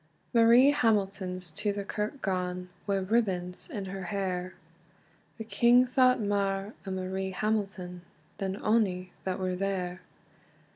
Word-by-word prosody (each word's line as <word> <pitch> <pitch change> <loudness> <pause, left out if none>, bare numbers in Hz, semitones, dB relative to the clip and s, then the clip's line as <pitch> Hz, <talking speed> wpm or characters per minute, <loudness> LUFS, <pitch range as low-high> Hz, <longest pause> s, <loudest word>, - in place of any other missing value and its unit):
MARIE 235 +4 +7
HAMILTON'S 195 - 0
to 205 +6 0
the 200 0 -4
kirk 210 +7 -4
gane, 180 -1 -2 0.2
Wi 200 -1 +2
ribbons 185 - 0
in 210 -10 -4
her 190 -1 -5
hair; 185 -1 -3 0.8
The 225 - -5
king 240 +3 +5
thought 255 0 +4
mair 200 0 -1
o - - -2
Marie 190 0 -2
Hamilton, 195 -3 -2 0.4
Than 195 -1 -2
ony 190 -5 +1
that 185 -1 -1
were 185 -1 -1
there. 185 -1 -2
195 Hz, 130 wpm, -29 LUFS, 185-215 Hz, 0.8 s, MARIE